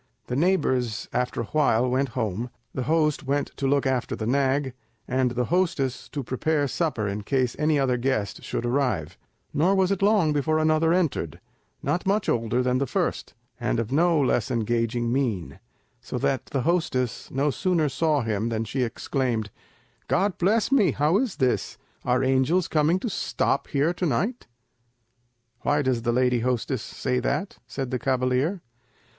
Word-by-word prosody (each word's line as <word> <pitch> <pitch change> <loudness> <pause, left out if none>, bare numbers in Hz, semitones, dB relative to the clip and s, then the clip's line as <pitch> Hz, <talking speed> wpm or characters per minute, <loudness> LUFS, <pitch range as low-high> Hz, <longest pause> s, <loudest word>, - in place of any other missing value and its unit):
The 125 - -3
neighbours 130 - +1
after 125 -1 -1
a - - -2
while 125 -2 +2
went 130 +2 +1
home, 110 +1 -2 0.2
the 130 - -3
host 155 -2 +2
went 145 +1 0
to 135 - -1
look 140 0 +2
after 130 -2 0
the 110 - -4
nag, 135 +1 +1 0.3
and 130 0 +1
the 125 0 -1
hostess 150 -8 0
to 145 -2 -4
prepare 145 +4 0
supper 140 -9 -1
in 100 +1 -3
case 125 +2 0
any 150 0 +2
other 130 -3 +2
guest 120 -5 -1
should 120 - -3
arrive; 120 - 0 0.4
nor 180 +6 +3
was 190 0 +2
it 195 - -1
long 200 -7 +3
before 155 +2 +1
another 155 +1 +3
entered, 155 - 0 0.4
not 180 +2 -1
much 200 +1 +1
older 115 +2 +1
than 125 0 +1
the 140 - 0
first, - - -2 0.2
and - - 0
of 115 0 -3
no 165 +2 +3
less 135 -1 +1
engaging 115 0 0
mien, 115 -10 -1 0.4
so - - -5
that 130 -4 -1
the 135 - -1
hostess 155 -8 0
no 140 +2 +1
sooner 170 -1 +1
saw 150 +1 +1
him 110 0 -1
than 110 -1 -1
she 130 +5 -3
exclaimed, 120 -3 -1 0.6
"God 195 0 +1
bless 215 +7 +2
me! 205 - +4
how 155 +7 +2
is 250 -6 -1
this? 130 -2 0 0.3
Are 125 +1 +1
angels 135 +7 +2
coming 155 +3 +2
to - - -2
stop 170 -7 -1
here 150 +4 +1
to 180 - -2
night?" 200 - -1 1.1
"Why 145 0 +1
does 130 -3 +1
the 120 0 0
lady 125 0 +2
hostess 125 +2 -1
say 125 -1 -2
that?" 150 +9 -2
said 135 -2 -4
the 125 - -1
cavalier. 130 - 0
135 Hz, 170 wpm, -25 LUFS, 125-155 Hz, 1.1 s, me